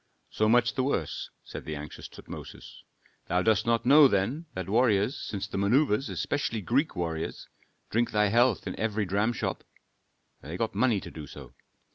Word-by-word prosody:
"So 110 0 +1
much 120 +1 +4
the 130 - 0
worse," 135 +2 -2
said - - -8
the 75 - -5
anxious 75 +1 -8
Tutmosis. - - -11 0.5
"Thou 90 +1 +1
dost 110 0 +2
not 115 0 +2
know, 145 +3 +8
then, 125 - -1
that 95 -1 -4
warriors, 110 +2 +2
since 100 -2 -4
the 100 - -4
manœuvres, 120 +4 +2
especially 130 -6 -2
Greek 135 - 0
warriors, 80 -2 -4 0.4
drink 115 +2 +1
thy 105 -1 +2
health 120 +1 +3
in - - -4
every 110 -1 0
dramshop." 105 +5 -1 0.8
"They 80 +5 -6
got 110 +3 -1
money 110 -1 +2
to - - -9
do 75 -2 -8
so." - - -11
110 Hz, 165 wpm, -28 LUFS, 100-125 Hz, 0.8 s, know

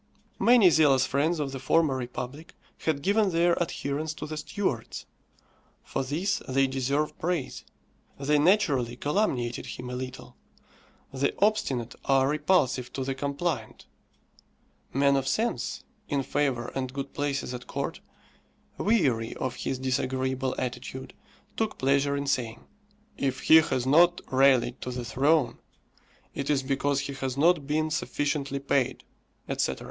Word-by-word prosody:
Many 235 -7 +6
zealous 140 -5 +4
friends 150 +6 0
of 140 -2 -2
the 135 - -5
former 150 +1 +2
republic 130 +4 -6 0.3
had 150 -3 0
given 205 +1 +3
their 170 0 +3
adherence 155 -1 -2
to - - -6
the 155 - -5
Stuarts. 150 - -3 0.8
For - - -3
this 170 +9 -1
they 135 +1 +3
deserve 135 +3 -1
praise. 170 -5 -2 0.6
They 145 +2 +2
naturally 145 - +2
calumniated 130 - -1
him 125 0 -6
a - - -4
little. 130 0 -7 0.8
The 135 +1 0
obstinate 135 - +1
are 135 -1 +3
repulsive 145 -5 +1
to 135 - -3
the 135 +1 -2
compliant. 140 -3 -3 1.1
Men 140 +1 +3
of 135 -1 0
sense, 225 - -1 0.3
in 140 -2 0
favour 135 -4 -1
and 130 -1 -3
good 140 +1 -6
places 140 -3 -2
at 125 0 -7
Court, - - -4 0.8
weary 135 - +1
of 130 - -3
his 135 - -3
disagreeable 130 0 -1
attitude, 130 +1 -5 0.4
took 220 -1 -1
pleasure 140 +1 +2
in 140 - -2
saying, 120 -4 -2 0.5
"If 135 -1 -1
he 160 - +7
has 130 -6 +2
not 170 +6 +5
rallied 130 -2 +3
to - - -4
the 125 -1 -4
throne, 140 +3 +2 0.7
it 140 - -4
is 140 -2 +2
because 140 +1 0
he 140 0 -5
has 135 -1 -4
not 155 -1 +3
been 155 +1 0
sufficiently 145 -2 -1
paid," 135 -2 0 0.4
etc. - - -1
140 Hz, 140 wpm, -27 LUFS, 130-155 Hz, 1.1 s, he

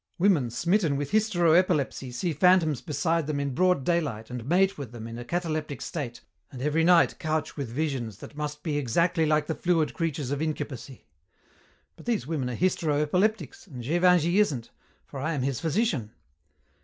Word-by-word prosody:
Women 170 -10 +3
smitten 170 - +1
with 145 0 -4
hystero 195 -6 +3
epilepsy 160 -7 +1
see 165 +7 -2
phantoms 160 -4 +3
beside 165 +3 -1
them 150 -2 -1
in 140 -1 -2
broad 180 0 +2
daylight 140 -10 -1
and 125 -2 -5
mate 190 +6 +3
with 140 -6 -7
them 115 -2 -8
in 115 +1 -7
a - - -5
cataleptic 155 -3 -3
state, 120 -7 -5 0.3
and 130 - -9
every 150 +4 +1
night 175 0 +4
couch 155 -1 -2
with 140 -5 -4
visions 125 -6 -3
that 145 - -11
must 150 0 -5
be 150 -3 -1
exactly 160 +5 +1
like 150 -1 +2
the 160 - -2
fluid 165 -2 +1
creatures 150 -5 -2
of 145 +1 -2
incubacy. 140 -5 -5 0.9
But - - -15
these 230 - 0
women 140 -4 -2
are 125 - -4
hystero 160 -4 +1
epileptics, 180 - 0
and 125 -8 -8
Gévingey 175 - +3
isn't, 135 - -1 0.3
for 135 - -8
I 155 +5 -1
am 135 - -1
his 135 -2 -1
physician. 160 - 0
155 Hz, 180 wpm, -27 LUFS, 135-175 Hz, 0.9 s, night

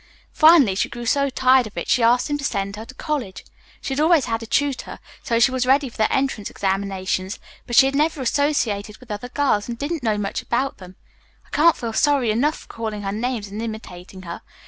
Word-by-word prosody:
Finally, 310 - +6
she 190 - -1
grew 240 0 -7
so 280 +4 +2
tired 260 -2 +3
of 210 - -15
it - - -4
she 250 - +2
asked 240 +2 +3
him 290 - -1
to - - -6
send 200 -6 -2
her 220 +2 -8
to 255 - -13
college. 270 - -4 0.4
She 270 - -3
had 270 - -2
always 320 -1 +4
had 225 0 -2
a 225 - -8
tutor, 280 +2 -1 0.2
so 230 -2 0
she 245 +2 +4
was 255 -1 -1
ready 270 +1 +3
for - - -16
the 215 - +1
entrance 265 -6 -1
examinations, 190 0 -2 0.3
but 240 - -2
she 265 - +8
had 270 - 0
never 305 +2 +1
associated 230 -7 0
with 255 -3 -13
other 210 +4 -5
girls 250 -6 0
and 235 - -4
didn't 295 +4 -3
know 220 -3 0
much 200 -1 -3
about 260 +3 -2
them. 185 0 -12 0.5
I - - -25
can't 320 +2 +4
feel 230 -2 -4
sorry 275 -2 +2
enough 280 +8 +1
for - - -16
calling 220 -2 -5
her 195 - -2
names 220 -1 -3
and 210 +3 -6
imitating 190 -5 -8
her. 170 -1 -7
235 Hz, 225 wpm, -22 LUFS, 205-275 Hz, 0.5 s, she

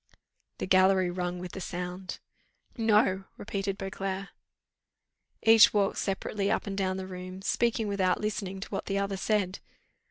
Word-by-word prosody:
The - - -3
gallery 185 -1 +4
rung 180 0 -2
with 180 0 -6
the 190 - -7
sound. 180 +1 -5 0.6
"No!" 210 -4 +3
repeated 195 -2 -3
Beauclerc. 195 0 -4 1.1
Each 225 -1 +7
walked 200 -1 +2
separately 195 +1 -1
up - - 0
and 200 -2 -4
down 190 -1 0
the 190 - -4
room, 185 0 -8
speaking 230 0 +1
without 190 -3 +1
listening 195 -2 -3
to - - -6
what - - -4
the 195 - 0
other 200 0 -1
said. 195 -1 0
195 Hz, 150 wpm, -29 LUFS, 185-200 Hz, 1.1 s, Each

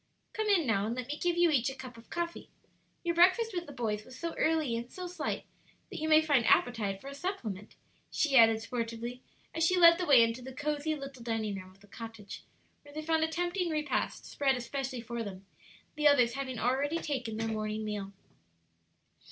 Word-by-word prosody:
"Come 435 -1 -1
in, 385 -7 +4
now, 210 -4 +1
and 230 - -2
let 255 +1 -5
me 295 - -2
give 350 -1 0
you 345 -1 +5
each 265 -4 +2
a 265 - -7
cup 255 -2 -9
of 230 0 -15
coffee. 340 0 -4 0.5
Your 340 -1 0
breakfast 375 +6 +4
with 350 -1 -3
the - - -8
boys 220 -5 -2
was 255 +3 -13
so 335 +2 -4
early 315 -7 +1
and 235 +2 -5
so 365 - -6
slight, 355 -2 -4 0.5
that - - -5
you 315 +1 -2
may 310 0 +6
find 285 -6 +3
appetite 210 -6 +2
for 270 - -11
a 280 - -6
supplement," 245 - -5 0.3
she 290 -3 +1
added, 225 -2 +7
sportively, 235 +1 -4 0.3
as 325 - 0
she 365 +3 +3
led 335 0 +8
the 360 - -1
way 260 -5 +8
into 230 +2 -1
the 260 +1 -9
cosey 300 +2 -1
little 275 -3 -8
dining 225 -3 -2
room 185 -1 -7
of 190 +1 -22
the 205 - -18
cottage, 225 -1 -9 0.4
where 290 - -15
they 310 - -4
found 320 0 +2
a - - +2
tempting 350 +2 -1
repast 305 -2 -2
spread 275 -2 +1
especially 255 0 -4
for 235 0 -5
them, 195 -2 -8 0.5
the 300 -1 +3
others 250 -5 +5
having 260 -2 -4
already 270 +7 +1
taken 255 -9 -3
their 225 0 -1
morning 215 0 -3
meal. 205 -2 -4
265 Hz, 210 wpm, -31 LUFS, 230-315 Hz, 0.5 s, led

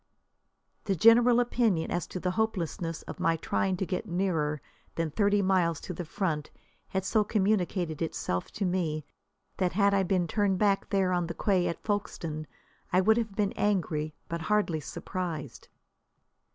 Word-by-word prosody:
The 195 - +1
general 235 +5 +6
opinion 230 -8 +1
as 175 -2 -1
to 185 - -5
the 180 0 -1
hopelessness 175 -5 -2
of - - -8
my 165 0 +2
trying 185 +3 -1
to 190 - -1
get 185 +4 -3
nearer 165 -5 0 0.4
than 165 -2 -1
thirty 205 +4 +2
miles 180 -5 +2
to 180 - -5
the 175 0 -5
front 155 -3 -2 0.4
had 190 0 -2
so 215 +2 +3
communicated 190 -6 0
itself 90 - -2
to 205 - -2
me 165 -5 -1 0.5
that 180 -2 0
had 200 0 +3
I 200 - +4
been 185 -2 +1
turned 200 +1 +1
back 200 0 +2
there 195 -3 +2
on 175 -1 0
the 170 - -5
quay 190 -4 +2
at 170 - -4
Folkstone, 165 -7 -3 0.4
I 180 - +4
would 220 +4 +4
have 220 -4 -2
been 205 -2 +1
angry, 160 -7 0
but 170 0 -4
hardly 205 -4 +1
surprised. 155 - -5
185 Hz, 165 wpm, -29 LUFS, 165-205 Hz, 0.5 s, general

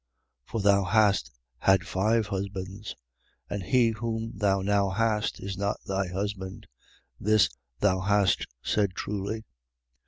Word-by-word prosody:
4:18. - - -25
For 115 - -1
thou 100 0 +4
hast 100 - +3 0.3
had 95 -2 +4
five 110 +4 +2
husbands: 100 +1 -5 0.6
and 100 - -2
he 120 +4 +3
whom 115 0 -3
thou 100 -2 +2
now 100 0 +2
hast 105 +1 0
is 95 -1 -5
not 100 0 -1
thy 95 -1 -1
husband. 95 0 -4 0.5
This, 110 -7 +4 0.3
thou 95 -2 +3
hast 100 0 +2 0.2
said 100 -3 +1
truly. 105 +2 -3
100 Hz, 130 wpm, -28 LUFS, 95-110 Hz, 0.6 s, thou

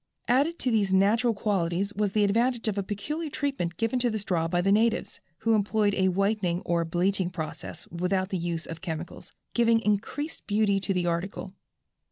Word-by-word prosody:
Added 285 +7 +2
to 255 - -1
these 205 -4 +2
natural 220 +5 +3
qualities 195 -1 0
was 205 -1 -1
the 215 - +3
advantage 230 +4 +2
of 210 - 0
a 200 - 0
peculiar 295 - -4
treatment 270 - -2
given 230 +3 0
to 245 0 +2
the 220 - -1
straw 180 -6 -1
by 175 +1 0
the 195 +2 +2
natives, 225 +2 +1 0.2
who 225 0 +1
employed 210 0 +2
a 190 -1 +2
whitening 190 -2 +1
or 170 -1 0
bleaching 180 +2 0
process 160 -4 -6
without 185 +2 -1
the 190 - -1
use 170 -1 -2
of 165 -1 -8
chemicals, 170 -2 -6 0.2
giving 230 -1 +4
increased 225 +9 -2
beauty 205 -1 +2
to 195 - -2
the 180 -1 +1
article. 175 +2 -3
200 Hz, 185 wpm, -27 LUFS, 180-225 Hz, 0.2 s, giving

